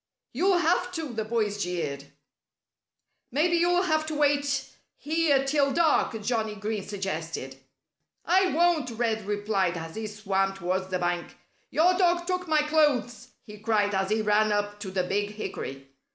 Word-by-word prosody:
"You'll 360 +8 +3
have 355 +2 +1
to," 320 -7 -4
the 220 -1 -2
boys 215 -2 -1
jeered. 155 -6 -3 1.3
"Maybe 335 +6 +2
you'll 355 +2 +3
have 315 -3 +1
to 310 - -3
wait 285 -1 +1 0.3
here 300 -3 +1
till 280 0 +2
dark," 310 -8 +2
Johnnie 220 -1 -1
Green 210 +1 -3
suggested. 165 -9 -4 0.7
"I 375 +2 +4
won't!" 335 -5 +2
Red 225 -3 -2
replied, 205 -4 0
as 165 0 -7
he 220 0 -4
swam 195 -2 -1
towards 185 0 -2
the 185 -1 -1
bank. 175 -1 -2 0.3
"Your 350 +4 +4
dog 345 -1 +3
took 365 0 -2
my 310 -1 +3
clothes," 290 -6 +1 0.2
he 210 -2 -12
cried 210 -2 +1
as 190 0 0
he 215 0 +1
ran 210 0 +3
up 205 0 -1
to 205 -2 -6
the 185 -1 -1
big 205 +3 -1
hickory. 135 -9 -6
220 Hz, 155 wpm, -27 LUFS, 195-310 Hz, 1.3 s, I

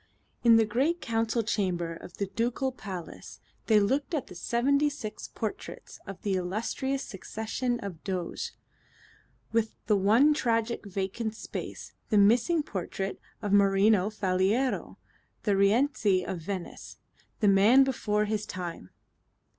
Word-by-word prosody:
In 230 -1 +7
the 225 -1 +5
great 270 +11 +1
Council 225 -2 0
Chamber 180 -6 -1
of 170 +1 -11
the 200 - -1
Ducal 235 +6 -1
Palace 190 -8 -8 0.3
they 215 -2 +6
looked 275 - 0
at 285 - -2
the - - -12
seventy 270 +10 +1
six 250 -7 -7
portraits 220 -2 -6
of 195 -1 -7
the 200 - 0
illustrious 220 +9 -2
succession 220 +5 -3
of 180 -6 -7
Doges 185 -3 -3 1.0
with 225 -1 0
the 210 - +3
one 225 +10 +5
tragic 230 -5 -1
vacant 200 +3 -3
space, - - -7 0.2
the 215 - +3
missing 240 +11 +4
portrait 195 -3 -4 0.2
of 205 -1 -1
Marino 200 0 +4
Faliero, 205 +5 0 0.5
the 205 -2 +2
Rienzi 200 -1 +3
of 180 - -4
Venice, 185 +2 -6 0.4
the 210 - +3
man 205 +7 +6
before 210 -5 0
his 210 0 -2
time. 170 - -6
215 Hz, 130 wpm, -28 LUFS, 195-240 Hz, 1.0 s, In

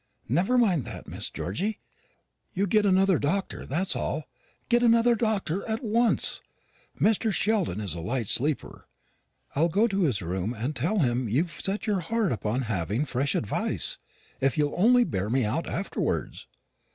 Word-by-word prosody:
"Never 180 - +2
mind 185 - +3
that, - - -8
Miss - - -4
Georgy. 200 - -3 0.8
You 195 +2 +1
get 210 +1 +3
another 190 -2 +4
doctor, 190 +7 -2
that's 175 +8 0
all; - - -2 0.4
get 240 0 +3
another 235 0 +5
doctor 205 -5 -1
at 220 +3 -2
once. 230 +1 +2 0.6
Mr. 220 +1 +2
Sheldon 200 - 0
is 100 -6 -2
a 85 - -6
light 115 +6 -2
sleeper. 145 +7 -2 0.7
I'll 165 +4 +3
go 205 +7 +3
to 200 -3 -1
his 125 - +1
room 95 +7 -2
and 125 +7 -3
tell 165 - 0
him 125 - +1
you've 155 - +1
set 195 +5 -3
your 205 -4 +1
heart 215 +2 0
upon 110 +2 -1
having 110 - -1
fresh 135 0 -1
advice; 105 - +1 0.4
if 135 +1 +1
you'll 145 -1 +1
only 245 +6 +5
bear 100 - -2
me 130 0 +2
out 125 +11 -1
afterwards." 195 +3 -3
170 Hz, 160 wpm, -27 LUFS, -, 0.8 s, another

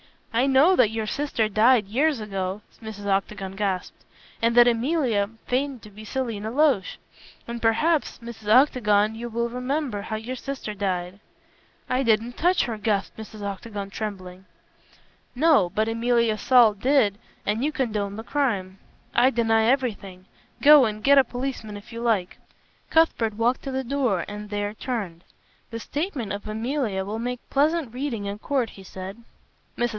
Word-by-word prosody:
"I 245 +4 +2
know 280 +8 +5
that 215 - +5
your 220 0 -3
sister 235 -2 -1
died 220 +2 +4
years 270 +7 +1
ago," 195 -1 -4 0.2
Mrs. 215 -2 -8
Octagon 195 -1 -2
gasped, 190 -2 -3 0.4
"and 230 +1 +2
that 240 0 +8
Emilia 240 -4 +1 0.2
feigned 260 -1 -2
to 210 - -12
be 215 +2 -11
Selina 225 -4 -3
Loach. 265 -6 +2 0.5
And 235 0 -5
perhaps, 300 +8 +1
Mrs. 230 -2 -10
Octagon, 215 -4 +4
you 235 +2 -6
will 235 +1 -1
remember 250 -3 -2
how 220 - -4
your 235 +4 -5
sister 260 -4 -5
died." 185 -2 -3 0.7
"I 255 +1 +1
didn't 230 0 +1
touch 355 +2 +3
her," 230 -2 -3
gasped 210 -2 -1
Mrs. 215 -1 -9
Octagon, 200 0 -5
trembling. 190 -3 -6 0.9
"No, 275 - +4
but 215 +4 0
Emilia 230 -1 +1
Saul 240 -2 +5
did, 215 -2 +2 0.3
and 215 +4 0
you 300 - +1
condoned 210 -7 -2
the 220 - -6
crime." 205 -10 -1 0.3
"I 245 +2 +5
deny 225 -2 +2
everything! 215 -8 -1 0.4
Go 295 -2 +8
and 215 -1 -4
get 280 0 +6
a - - +6
policeman 245 -4 -5
if 220 +4 -13
you 230 - -6
like." 215 -6 0 0.5
Cuthbert 240 -10 +2
walked 235 +3 +1
to 270 - -4
the 265 0 -2
door 250 -8 0
and 210 0 -7
there 205 0 -2
turned. 205 -8 -5 0.5
"The 230 - -6
statement 285 - -3
of 205 +1 -6
Emilia 220 -3 -2
will 215 +3 -4
make 245 +1 -4
pleasant 295 -2 +1
reading 250 -5 -3
in 200 +1 -5
court," 260 -2 -1
he 195 - -13
said. 190 +2 -8 0.6
Mrs. 240 0 +1
225 Hz, 160 wpm, -24 LUFS, 205-255 Hz, 0.9 s, that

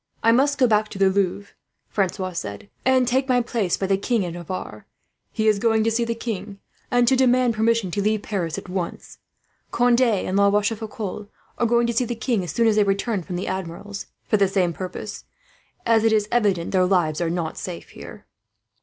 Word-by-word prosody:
"I 230 - +5
must 280 +4 +3
go 260 - +4
back 215 -2 +2
to - - -8
the 195 0 +4
Louvre," 200 +1 -1 0.3
Francois 190 -1 -1
said, 105 - -6
"and 260 -1 +3
take 260 +2 +1
my 250 -1 +4
place 230 -6 -1
by 195 - -2
the 195 0 +1
King 225 -1 0
of 170 - -5
Navarre. 175 +2 -7 0.4
He 220 -1 0
is 210 -2 +3
going 225 0 +2
to 225 - +1
see 235 +1 +1
the 230 0 -2
king, 215 -3 -5 0.3
and 245 -1 +3
to 265 - +5
demand 255 -2 +3
permission 220 -3 +1
to 200 - -1
leave 215 +1 0
Paris 175 -6 -3
at 195 - -7
once. 180 -1 -5 0.5
Conde 245 +1 +3
and 205 -5 +1
La 200 0 +5
Rochefoucault 210 -1 -2 0.3
are 235 - +3
going 235 +1 +3
to 235 - -1
see 245 +2 +1
the 240 - -3
king, 225 -3 -1
as 175 - -4
soon 230 +8 +1
as 220 -1 +3
they 210 - +5
return 200 +1 0
from 180 +1 -6
the 180 - -3
Admiral's, 190 +2 -5 0.2
for 215 - +2
the 200 -1 +3
same 185 -3 +1
purpose; 190 +4 -7 0.6
as 225 -1 +3
it 225 - +4
is 210 -1 +2
evident 200 -8 +1
their 185 -1 +3
lives 175 -4 +1
are 170 - 0
not 165 -2 -2
safe 175 -2 -7
here." - - -11
210 Hz, 210 wpm, -23 LUFS, 185-230 Hz, 0.6 s, I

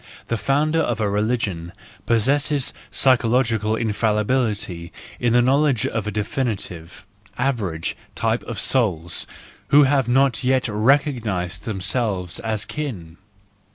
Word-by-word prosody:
The 115 - +1
founder 145 +8 +1
of 120 -8 0
a 105 - +1
religion 100 -5 -1 0.3
possesses 135 +4 +2 0.2
psychological 115 -4 +2
infallibility 105 -4 -1 0.3
in 120 -1 +1
the 120 0 +5
knowledge 135 -2 +2
of 110 -2 -2
a - - -1
definite, 110 0 -2 0.7
average 110 -11 -1 0.2
type 115 +1 0
of 115 -5 -4
souls, 90 -8 +1 0.4
who 145 +1 +6
have 135 -2 +2
not 130 0 +2
yet 130 0 +2
recognised 110 - 0
themselves 100 -3 -1
as 110 -2 -2
akin. 100 - -6
115 Hz, 115 wpm, -22 LUFS, 105-130 Hz, 0.7 s, who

